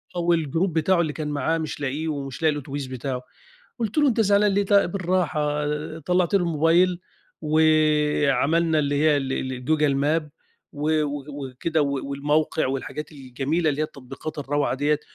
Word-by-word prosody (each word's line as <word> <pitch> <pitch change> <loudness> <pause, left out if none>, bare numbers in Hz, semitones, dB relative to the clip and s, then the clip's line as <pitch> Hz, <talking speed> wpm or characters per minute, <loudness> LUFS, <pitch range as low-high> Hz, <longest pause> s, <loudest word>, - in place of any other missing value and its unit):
والجروب 170 0 +1
بتاعه 170 +3 +2
اللي 155 -3 -2
كان 155 0 -4
معاه 155 +3 0
مش 155 -2 -5
لاقيه، 145 +4 -2
ومش 140 -3 -4
لاقي 160 -1 +4
الأتوبيس 140 -1 -5
بتاعه. 130 0 -4 0.6
قُلت 225 +1 -3
له: 295 -1 +5
"أنت 230 -3 +2
زعلان 205 0 +3
ليه؟ 200 - +2
ت 205 - 0
بالراحة." 175 -6 +1 0.3
طلعت 180 +3 0
له - - +5
الموبايل 170 +2 +2 0.4
وعملنا 155 0 +2
اللي 145 -1 0
هي 150 0 +3
ال 135 -1 -2 0.2
ال 125 0 -8
جوجل 150 -1 +2
ماب 150 +3 0 0.4
و 155 +1 +1
و 145 -1 -4 0.3
وكده 155 +5 -1
و 140 -1 -2
والموقع 145 +2 0
والحاجات 135 +3 -4
الجميلة 140 +4 -1
اللي 150 +1 -1
هي - - +2
التطبيقات 135 +3 -9
الروعة 145 -1 0
ديّة، 145 +2 +1
150 Hz, 160 wpm, -24 LUFS, 140-165 Hz, 0.6 s, له